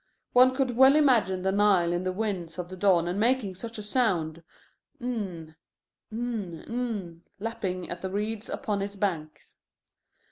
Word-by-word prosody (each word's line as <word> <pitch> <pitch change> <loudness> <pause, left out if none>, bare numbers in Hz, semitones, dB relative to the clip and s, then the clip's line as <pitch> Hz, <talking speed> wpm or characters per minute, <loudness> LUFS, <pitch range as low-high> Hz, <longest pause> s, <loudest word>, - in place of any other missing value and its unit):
One 255 +1 +6
could 265 -2 +1
well 265 +3 +7
imagine 230 -11 +3
the 190 - +2
Nile 195 -4 +3
in 175 - 0
the 185 - 0
winds 185 -5 -3
of 180 -1 -5
the 185 - -7
dawn 180 -1 +2
making 230 -3 +2
such 225 +5 -5
a 210 - -5
sound: 180 -9 0 0.6
"NN, 195 -10 -4 0.6
N, 220 -7 -4
N," 215 -9 -4 0.2
lapping 190 -4 -3
at 175 0 -6
the 190 - -3
reeds 210 +3 -3
upon 210 -6 -2
its 200 +1 -4
banks. 170 -6 -4
200 Hz, 150 wpm, -27 LUFS, 180-230 Hz, 0.6 s, well